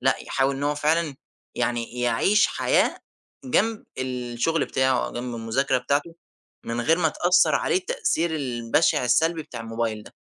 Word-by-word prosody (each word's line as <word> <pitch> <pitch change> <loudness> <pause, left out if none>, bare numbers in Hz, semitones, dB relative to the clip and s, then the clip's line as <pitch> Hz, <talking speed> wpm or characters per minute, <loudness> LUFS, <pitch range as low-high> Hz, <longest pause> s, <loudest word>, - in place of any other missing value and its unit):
لأ، - - +2
يحاول 135 0 0
إن 140 - -5
هو 145 +1 +1
فعلًا 155 0 0 0.4
يعني 120 0 -2
يعيش 125 - +3
حياة - - +1 0.5
جنب 225 -3 0
الشغل 125 +4 -1
بتاعه 130 -1 +1
أو - - -7
جنب 120 0 -5
المذاكرة 115 +4 0
بتاعته 145 +6 -1 0.5
من 115 +1 -3
غير 165 +7 +2
ما 160 -2 +3
تأثر 180 +3 +3
عليه - - +1
التأثير 375 - -1
البشع 125 +1 +1
السلبي 160 +6 +2
بتاع 120 -5 -9
الموبايل 115 -1 -3
ده. - - -15
135 Hz, 150 wpm, -24 LUFS, 120-165 Hz, 0.5 s, يعيش